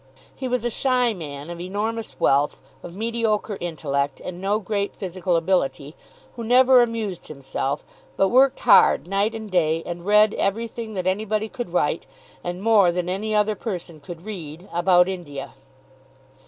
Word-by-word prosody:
He 260 - -4
was 250 -1 -1
a 240 - 0
shy 250 -1 +1
man, 150 -3 -7
of 170 0 -7
enormous 215 +5 -4
wealth, 140 +1 +2 0.2
of 175 - -10
mediocre 220 -1 -1
intellect, 145 -5 -2
and 180 0 -7
no 200 +2 +1
great 205 -1 -2
physical 185 -2 -2
ability, 160 -4 0 0.4
who 235 - -6
never 250 +2 +6
amused 225 -6 -2
himself; 140 0 -4 0.3
but 195 - +3
worked 265 +3 +4
hard 210 -7 +6
night 200 +4 0
and 220 -2 -7
day, 165 -2 +1
and 175 0 -6
read 210 +2 +5
everything 225 +1 -2
that 185 -2 -2
anybody 215 +3 0
could 240 -7 -6
write, 165 -2 0 0.4
and 175 +2 -5
more 210 -5 +5
than 180 0 -2
any 215 +4 -1
other 210 0 +3
person 180 -7 -6
could 170 +4 -10
read, 175 -4 -8
about 175 +1 +4
India. 170 -8 -6
195 Hz, 155 wpm, -23 LUFS, 170-220 Hz, 0.4 s, never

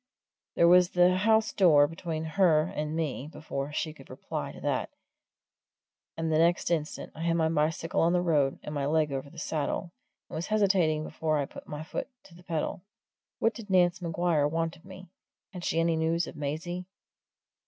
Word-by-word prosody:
There 170 - +5
was 180 0 +6
the 180 0 +4
house 220 +3 +3
door 155 -7 +6
between 165 0 -4
her 160 -1 +3
and 155 -3 -4
me 150 -4 -2
before 145 -2 -5
she 155 +1 -2
could 135 -4 -16
reply - - -5
to - - -12
that, - - -1 1.3
and 165 0 -1
the 155 - +3
next 170 +1 +2
instant 155 -3 -2
I 160 - -9
had 165 0 +1
my 160 -1 +2
bicycle 160 +1 0
on 165 - +4
the 180 0 +2
road 145 -5 +2
and 150 - -6
my 140 -2 -1
leg 155 -1 +2
over 135 +1 -4
the - - -16
saddle, 160 +3 -2 0.4
and - - -15
was 160 +2 -3
hesitating 190 -7 +2
before 155 0 -1
I 145 - 0
put - - -12
my 150 +1 -6
foot 160 - -4 0.2
to 175 - -17
the 175 - -15
pedal. 170 -1 -3 0.6
What 225 - +1
did 220 -3 -10
Nance 180 -1 +3
Maguire 165 -3 +1
want 165 +1 -1
of 165 - -20
me? 185 0 -11 0.5
Had 180 -2 -7
she 165 - 0
any 165 0 +2
news 165 +1 +1
of - - -9
Maisie? 165 +5 -4
165 Hz, 190 wpm, -29 LUFS, 155-175 Hz, 1.3 s, was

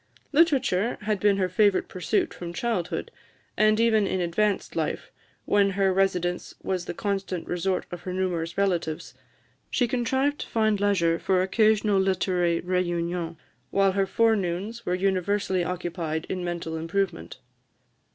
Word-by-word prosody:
Literature 275 - +2
had 210 -1 -1
been 205 0 +3
her 185 -2 +1
favourite 200 +2 +2
pursuit 185 -3 -1
from 175 -1 -7
childhood, 200 -4 -2 0.4
and 215 +1 +3
even 220 -3 +3
in 185 - -1
advanced 195 +4 0
life, - - -2 0.3
when 200 -1 +3
her 195 -1 +3
residence 180 -2 0
was 185 -2 -2
the - - -4
constant 195 -3 -2
resort 180 +1 -1
of 175 - -6
her 185 - -5
numerous 175 -2 -2
relatives, 170 -10 -1 0.6
she 245 - +1
contrived 265 +4 0
to - - -5
find 220 -2 +1
leisure 170 -5 +2
for 185 -1 +2
occasional 215 0 +3
literary 180 -3 +1
réunions, 175 -2 -1 0.3
while 195 -1 +3
her 195 0 +1
forenoons 215 0 0
were 180 - +1
universally 190 0 0
occupied 170 -3 -3
in 185 -1 -3
mental 170 -2 -3
improvement. 165 - -2
190 Hz, 140 wpm, -26 LUFS, 175-205 Hz, 0.6 s, been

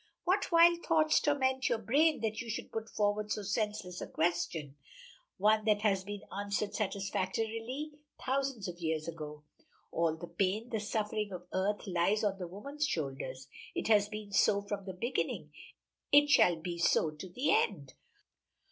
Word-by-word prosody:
What 370 +2 +1
wild 340 0 +6
thoughts 310 -2 +4
torment 265 -2 +1
your 235 - +2
brain 285 +8 +2
that 220 -1 -1
you 235 - -7
should 225 - -4
put 225 0 -4
forward 210 0 0
so 210 - -1
senseless 200 -2 -2
a - - -4
question? 160 -4 -1 0.6
one 215 +1 +4
that 210 -1 +2
has 195 -3 +2
been 205 +1 -6
answered 205 +1 -2
satisfactorily 225 +7 -2 0.3
thousands 265 -5 -1
of 175 -1 -7
years 160 -2 -2
ago. 150 -2 -7 0.5
All 165 -1 +1
the 175 - -7
pain, 195 +7 -1
the 225 - -1
suffering 210 0 -2
of 180 -1 -7
earth 200 +3 0
lies 190 +3 +1
on 195 -2 0
the 180 - -4
woman's 280 - -3
shoulders; 135 - -4 0.3
it - - -2
has 210 -1 +5
been 210 -1 -7
so 200 0 +3
from 200 -1 -4
the 190 - -5
beginning 235 +8 -2 0.6
it 290 0 +6
shall 175 -10 +6
be 170 +1 -5
so 160 -2 +3
to 155 +5 -9
the 250 +11 +1
end. 145 -11 0
205 Hz, 165 wpm, -32 LUFS, 180-230 Hz, 0.6 s, wild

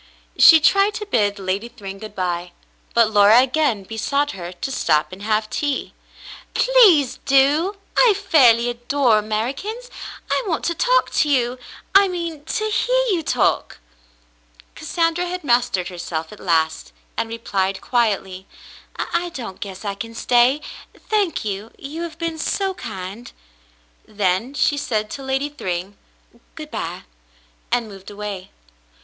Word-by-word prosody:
She 325 - +8
tried 395 +6 +3
to 425 - -4
bid 210 - +1
Lady 195 +4 -3
Thryng 195 -4 -9
good 215 0 -10
by, 175 -1 -3 0.4
but 230 -2 +4
Laura 210 +2 +6
again 260 -5 +1
besought 280 +8 -1
her 175 -2 -7
to 180 +9 -5
stop 155 - +1
and 185 +1 -10
have 215 0 0
tea. 285 +5 -2 0.6
"Please 360 - +5
do. 285 +8 +3 0.2
I 465 -5 +5
fairly 255 - +4
adore 240 -1 +2
Americans. 270 - -4 0.4
I - - +1
want 330 -4 -2
to 340 - +1
talk - - +2
to 300 - +1
you; 250 -2 +1 0.3
I 395 0 +7
mean, 335 -5 -5
to 430 - -2
hear - - +2
you 350 -4 +1
talk." - - 0 1.0
Cassandra 330 +2 -1
had 360 0 -5
mastered 240 -8 +1
herself 170 -3 -5
at 210 - -13
last, 160 -2 0 0.2
and 225 - -2
replied 195 -4 -2
quietly: 195 -6 -1 0.5
"I 345 +1 -2
don't 230 -7 -7
guess 195 0 -7
I 200 - -1
can 230 +3 -8
stay, 245 +5 +3 0.4
thank 410 - -1
you. 205 +1 -4
You 300 +4 -7
have 335 -2 -6
been 330 -1 -4
so 385 +4 -1
kind." 210 - -8 0.8
Then 205 +5 -1
she 290 0 +2
said 215 -6 -2
to 275 - -6
Lady 270 +2 -1
Thryng, 190 - -4 0.6
"Good - - -9
by," - - -5 0.7
and 240 -2 +1
moved 195 -2 -11
away. 205 -2 -6
240 Hz, 145 wpm, -21 LUFS, 200-320 Hz, 1.0 s, She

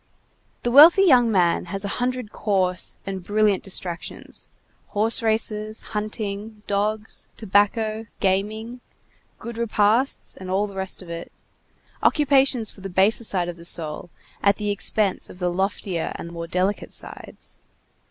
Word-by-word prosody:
The 240 - 0
wealthy 320 +8 +9
young 250 -10 +5
man 180 -4 +2
has 195 +3 -3
a 200 - -3
hundred 250 -3 -2
coarse 185 -4 0
and 190 -2 -5
brilliant 210 0 +2
distractions, 180 -3 -5 0.4
horse 220 +4 0
races, 215 -1 0
hunting, 210 0 -4
dogs, 210 +2 -2
tobacco, 215 +2 +1
gaming, 215 +5 -1 0.6
good 235 0 -7
repasts, 230 +3 +1
and 185 0 -9
all 195 +3 +1
the 200 - -9
rest 190 0 -3
of 170 - -10
it; 170 0 -7 0.7
occupations 270 -6 +3
for 195 - -14
the 195 - -6
baser 195 +6 +3
side 185 -5 0
of 175 -1 -6
the 170 - -12
soul, 165 0 -1 0.3
at 200 0 +4
the 210 0 -2
expense 205 0 0
of - - -12
the 180 -1 -1
loftier 190 -2 -2
and 170 - -7
more 170 0 -6
delicate 185 +4 -1
sides. - - -10
205 Hz, 145 wpm, -23 LUFS, 190-220 Hz, 0.7 s, wealthy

